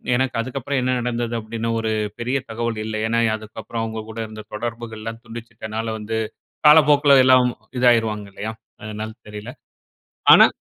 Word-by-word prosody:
எனக்கு 130 0 0
அதுக்கப்பறம் 130 +2 -2
என்ன 130 0 +1
நடந்தது 120 -1 -2
அப்டீன்னு 115 +1 -3
ஒரு 110 0 -1 0.3
பெரிய 125 +3 0
தகவல் 115 0 -2
இல்ல. 110 0 -4
ஏன்னா 115 +1 +1 0.2
அதுக்கப்பறம் 110 +1 -6
அவங்க 110 0 -4
கூட 110 - -9
இருந்த 110 0 -9
தொடர்புகள்லாம் 115 0 -5
துண்டிச்சிட்டனால 115 -1 -6
வந்து 110 +1 -3 0.5
காலப்போக்குல 145 -2 +7
எல்லாம் 130 -1 +6 0.3
இதாயிருவாங்க 110 -4 +3
இல்லையா? 110 +2 -4 0.3
அதனால 110 +1 -5 0.2
தெரியல. 105 +3 -7 0.8
ஆனா. - - +9
115 Hz, 135 wpm, -22 LUFS, 110-125 Hz, 0.8 s, ஆனா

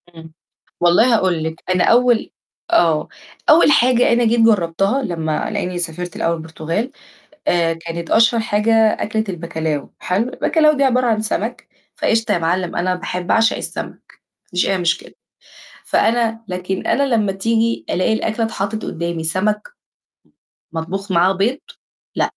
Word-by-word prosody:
إمم، 160 -1 -13 0.5
والله 175 +8 +4
هاقول 180 -6 0
لِك 160 0 -5
أنا 180 - +2
أول 240 -1 +3 0.4
آه، 160 - +3 0.4
أول 305 -1 +6
حاجة 245 -2 +4
أنا 240 0 +2
جيت 230 +1 +2
جرّبتها 200 +3 +2
لمّا 160 -4 -2
لإنّي 185 -4 -3
سافرت 175 +1 -4
لأول 170 0 0
البرتغال، 160 - -4 0.6
آآ، 170 -1 +2
كانت 165 0 -7
أشهر 230 +1 +4
حاجة 215 +1 0
أكلة 220 0 +2
الBacalhau 160 -4 -3
حلو 215 +8 -1
الBacalhau 305 0 +2
دي 275 - +2
عبارة 255 -1 +2
عن 220 -2 +1
سمك 220 - -3 0.3
فقشطة 225 0 +1
يا - - +1
مِعلّم 175 +2 -1
أنا 180 +1 0
باح 180 0 -4
باعشق 225 +5 +2
السمك، - - -6
ما - - -41
فيش 180 -1 0
أي 195 - +1
مشكلة، 170 -2 -1 0.7
فأنا 225 0 +1
لكن 185 +1 -4
أنا 280 - +2
لمّا 205 -3 +1
تيجي 225 +4 0
ألاقي 185 +5 +1
الأكلة 220 +1 -1
اتحطّت 215 0 -4
قدّامي 170 -1 -4
سمك 210 +6 0 1.1
م 165 - -4
مطبوخ 195 +4 -4
معاه 180 +2 +4
بيض، 220 +9 0 0.6
لأ. - - +1
195 Hz, 150 wpm, -19 LUFS, 170-225 Hz, 1.1 s, أول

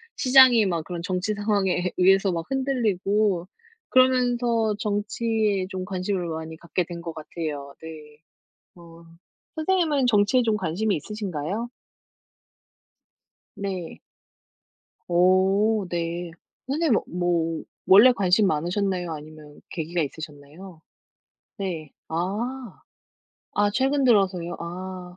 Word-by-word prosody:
시장이 255 -4 +6
막 170 -4 -1
그런 175 -2 -5
정치 185 +3 -1
상황에 205 -2 0 0.2
예 - - -3
의해서 195 +1 +4
막 165 -1 -3
흔들리고, 210 -8 0 0.4
그러면서 245 -3 +3
정치에 210 -1 -1
좀 190 -1 -5
관심을 185 -1 -2
많이 160 0 -6
갖게 170 +2 -3
된 170 -1 -8
것 170 -1 -6
같아요. 150 -3 -6
네. 150 -2 -11 0.6
어, 170 -1 -15 0.5
선생님은 315 -5 +1
정치에 220 +3 +3
좀 220 -2 +1
관심이 205 +3 -1
있으신가요? 200 +3 -4 1.9
네. 190 -4 -5 1.1
오 190 +4 +3
네. 170 0 -3 0.4
선생님은 280 -3 +1
뭐 170 -2 -1 0.2
원래 210 +7 +8
관심 200 -2 +3
많으셨나요, 180 +2 -1
아니면은 150 -1 -12
계기가 170 +1 -3
있으셨나요? 155 +3 -8 0.8
네. 170 -7 -5 0.2
아. 215 +8 -4 0.8
아 205 0 +2
최근 270 +4 +1
들어서요. 185 -7 +2
아. 180 +1 -7
185 Hz, 230 characters per minute, -24 LUFS, 170-220 Hz, 1.9 s, 원래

